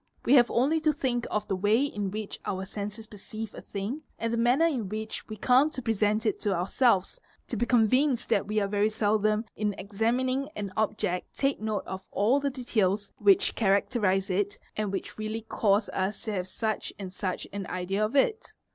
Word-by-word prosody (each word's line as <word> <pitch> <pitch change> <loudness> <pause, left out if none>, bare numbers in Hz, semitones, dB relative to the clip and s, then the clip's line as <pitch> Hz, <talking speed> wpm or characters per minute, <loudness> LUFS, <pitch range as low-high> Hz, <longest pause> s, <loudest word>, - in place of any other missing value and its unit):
We 250 - +4
have 245 -4 +7
only 280 +7 +2
to 310 0 +3
think 260 -5 -1
of 210 0 -1
the 195 - 0
way 210 +8 +3
in 205 -8 -3
which 210 +1 -5
our 190 0 -3
senses 210 +2 -6
perceive 215 +1 -8
a - - -9
thing 210 +9 -4 0.2
and 230 0 -2
_ - - +2
the 230 - +1
manner 250 +7 +4
in 250 - -1
which 215 +1 -5
we 215 - -5
come 255 +7 +4
to 265 - -6
present 215 -1 +1
it 215 - +1
to 205 -3 0
ourselves, 195 - +2 0.3
to - - -2
be 240 +2 0
convinced 250 +3 +3
_ - - -24
that 195 - +2
we 215 +1 -2
very 205 +1 +1
seldom 215 0 +1
in 210 -2 -1
examining 245 +7 0
an 200 -2 -4
object 210 -4 -1
take 275 -4 +1
note 215 -2 -2
of 190 0 -7
all 225 +8 +2
the 280 0 0
details 215 -6 0
_ - - -39
which 200 -2 +5
characterise 195 -2 +1
it 200 +2 0 0.2
and 210 -2 -1
which 195 - -5
really 215 +1 -3
cause 210 -1 +1
us 195 +2 -2
to 220 - -3
have 185 -2 -2
such 215 +2 -2
and 190 -2 -7
such 185 -1 -3
an 200 -2 -4
idea 185 +3 -1
of 215 +6 -1
it. 445 - +1
215 Hz, 205 wpm, -28 LUFS, 200-240 Hz, 0.3 s, have